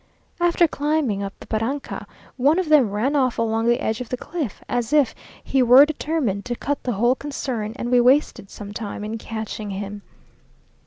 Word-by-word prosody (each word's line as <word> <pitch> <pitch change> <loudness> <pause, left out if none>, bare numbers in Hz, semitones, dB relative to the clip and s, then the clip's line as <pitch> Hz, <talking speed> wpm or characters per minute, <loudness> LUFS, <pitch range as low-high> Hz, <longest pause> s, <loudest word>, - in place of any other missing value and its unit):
After 345 0 +4
climbing 290 -9 0
up 200 0 -4
the - - -11
barranca, 230 +6 -3 0.3
one 285 +6 +3
of 370 -4 -1
them 285 -8 +5
ran 225 +8 0
off 260 -4 +1
along 225 0 0
the 240 0 +3
edge 220 +2 -2
of 245 - -6
the 250 - -2
cliff, 300 - -5
as 245 -2 -2
if 295 -4 +4 0.3
he 270 - +1
were 250 +3 +8
determined 295 -9 -2
to 245 -1 -3
cut 285 +4 -3
the 245 - -2
whole 240 +5 +3
concern, 255 -6 -4
and 240 0 -4
we 245 -1 +5
wasted 255 -5 +2
some 205 -1 -9
time 210 -1 -5
in 220 +2 -4
catching 220 -1 -5
him. 200 +1 -5
245 Hz, 190 wpm, -22 LUFS, 220-285 Hz, 0.3 s, were